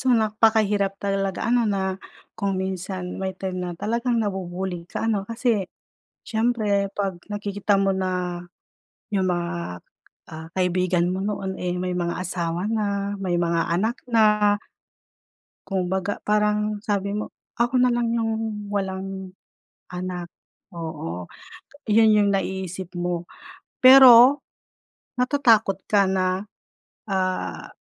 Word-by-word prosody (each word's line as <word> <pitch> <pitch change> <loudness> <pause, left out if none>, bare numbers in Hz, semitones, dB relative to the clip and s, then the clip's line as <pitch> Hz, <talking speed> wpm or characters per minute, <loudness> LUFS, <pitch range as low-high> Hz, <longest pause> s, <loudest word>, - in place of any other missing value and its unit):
So, - - -6
napakahirap 215 -2 +2
talaga 195 -1 -1
ano 240 -1 +3
na 190 -1 -1 0.4
kung 195 -1 -1
minsan 185 -1 -4
may 190 -1 -3
time 185 -1 -4
na 180 -1 -3
talagang 235 +5 -1
nabu-bully 185 -3 -4
ka - - -4
ano 200 -3 -1
kasi, 230 -4 0 0.6
siyempre 220 -3 +1
pag 195 -3 -2
nakikita 205 -1 -1
mo 195 0 +2
na, 180 -2 -2 0.7
yung 190 -2 +1
mga, 170 - -3 0.5
ah, 160 0 -8
kaibigan 180 -1 +1
mo 190 - -2
noon, 195 -1 -3
eh, 180 0 -2
may 180 0 -2
mga 175 -1 -2
asawa 175 -1 -2
na, 200 -2 -1
may 180 -3 0
mga 170 -1 0
anak 220 +9 0
na 210 -3 +4 1.1
kumbaga 190 +1 -2
parang 210 0 +1
sabi 200 0 -1
mo, 210 - -5 0.2
"Ako 240 +2 +2
na 250 - +5
lang 235 -1 0
yung 225 -2 -2
walang 190 -1 -4 0.6
anak," 180 -1 -5 0.4
oo, 150 - -6 0.6
'yon 220 +1 +6
yung 205 -1 +4
naiisip 190 -2 -3
mo. 175 -1 -2 0.6
Pero, 260 +1 +9 0.8
natatakot 230 -7 +3
ka 200 -2 +4
na, 185 +1 0 0.6
ah, 185 -1 -2
195 Hz, 120 wpm, -24 LUFS, 180-210 Hz, 1.1 s, Pero